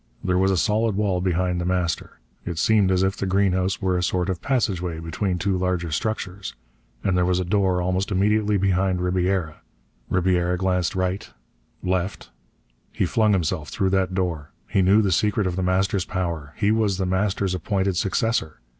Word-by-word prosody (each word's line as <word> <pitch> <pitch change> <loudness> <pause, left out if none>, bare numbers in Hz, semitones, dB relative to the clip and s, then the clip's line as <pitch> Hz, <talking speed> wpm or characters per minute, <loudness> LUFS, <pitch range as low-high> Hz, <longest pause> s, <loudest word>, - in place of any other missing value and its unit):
There 90 -1 +1
was 95 +1 +3
a 95 - +2
solid 110 +3 +1
wall 100 -3 0
behind 90 -1 0
The - - -3
Master. 90 -2 -1 0.3
It 85 -2 -5
seemed 105 +2 +3
as 95 0 +2
if 95 0 +1
the 100 - -3
greenhouse 95 0 +1
were 90 -1 +1
a - - -1
sort 90 +1 0
of 90 - -5
passageway 95 - -1
between 90 +3 -2
two 95 +2 0
larger 90 -2 -1
structures. 95 +1 -3 0.5
And 95 - +1
there 90 - +3
was 90 0 +1
a 90 - -1
door 95 -1 +1
almost 95 +2 0
immediately 105 +1 +2
behind 95 -1 +1
Ribiera. 90 -3 0 0.5
Ribiera 90 -1 +1
glanced 90 -1 0
right 95 +2 -2 0.5
left 90 -7 -2 0.6
He - - 0
flung 110 +1 +2
himself 85 -5 -1
through 95 +6 0
that 95 -1 +1
door. 85 -6 -2 0.2
He 95 - +1
knew 100 +4 +5
the 100 - +1
secret 105 +3 +1
of 90 -1 -1
The 95 - -2
Master's 95 +1 +1
power. 85 -6 -3
He 105 - +1
was 110 -4 +1
The 95 - -1
Master's 95 0 0
appointed 95 +1 -1
successor. 95 - 0
95 Hz, 180 wpm, -23 LUFS, 90-100 Hz, 0.6 s, knew